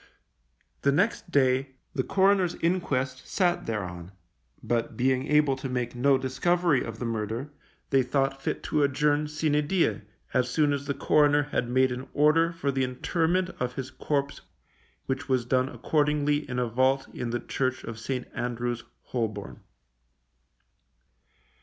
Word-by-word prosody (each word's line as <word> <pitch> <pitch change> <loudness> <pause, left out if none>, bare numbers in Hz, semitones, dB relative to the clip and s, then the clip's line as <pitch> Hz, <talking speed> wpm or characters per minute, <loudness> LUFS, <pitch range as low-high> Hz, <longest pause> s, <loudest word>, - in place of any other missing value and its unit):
The 140 - +3
next 185 +5 +1
day 135 -2 +2 0.2
the 130 - +1
coroner's 190 +2 +2
inquest 140 -7 -1
sat 180 -2 +1
thereon, 90 -5 -4 0.5
but 115 -1 -1
being 130 +1 +1
able 150 -2 +3
to 135 0 -5
make 125 -1 -2
no 135 +2 +3
discovery 155 +3 +1
of - - -6
the 120 - -4
murder, 115 +5 -3 0.4
they 135 -1 +5
thought 135 +1 0
fit - - -3
to 150 - 0
adjourn 145 +2 +2
sine 150 -1 0
die, 185 -7 +1 0.3
as 125 -1 +2
soon 145 +2 +2
as 140 0 -4
the 140 - -1
coroner 145 +1 +4
had 130 -4 -2
made 130 +1 +3
an 125 +2 -5
order 155 +3 +4
for 155 -5 -2
the 135 -1 0
interment 170 +8 0
of 125 0 -2
his 130 0 -5
corpse 140 +1 -2 0.6
which 135 +2 -3
was 130 -2 +2
done 130 +1 +1
accordingly 145 +3 0
in 125 - -3
a 125 - +1
vault 130 +3 +2
in 120 - -4
the 120 +1 -1
church 130 0 -2
of 115 0 -7
St. 125 +2 -3
Andrew's, 120 0 -3 0.2
Holborn. 105 - -4
135 Hz, 150 wpm, -27 LUFS, 125-150 Hz, 0.6 s, they